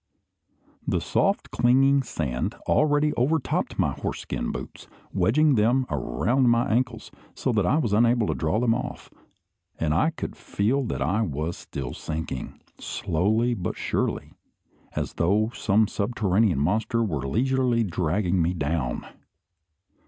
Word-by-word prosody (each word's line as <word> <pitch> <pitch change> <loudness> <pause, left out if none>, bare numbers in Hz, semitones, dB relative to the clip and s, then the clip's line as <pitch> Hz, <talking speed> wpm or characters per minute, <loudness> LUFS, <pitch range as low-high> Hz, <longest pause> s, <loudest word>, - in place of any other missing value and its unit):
The - - +1
soft, - - 0
clinging 135 +3 +4
sand 70 - -3
already 150 0 +3
overtopped 135 +4 0
my - - +1
horseskin - - -4
boots, - - -8 0.3
wedging 150 +6 +3
them 120 +3 +3
around 110 - +1
my 120 +2 +3
ankles, 120 -1 -1 0.2
so 130 - -1
that 105 -6 +1
I 140 - +3
was 115 -10 0
unable 115 +1 +3
to - - 0
draw 80 +7 0
them 120 -1 +3
off; - - -5 0.7
and 75 -2 +1
I 155 - +3
could 165 - -6
feel 115 +8 0
that 115 - -2
I 95 +10 +1
was 80 -3 -2
still 65 -3 -6
sinking, 80 -4 -5 0.2
slowly 110 +9 0
but 90 -6 -4
surely, - - -2 0.6
as - - -2
though 105 +6 +1
some 105 +2 +2
subterranean 100 - +1
monster 110 - +1
were 75 -10 -2
leisurely 125 - +1
dragging 90 0 0
me 85 +2 0
down! 70 -5 -2
110 Hz, 135 wpm, -25 LUFS, 85-125 Hz, 0.7 s, clinging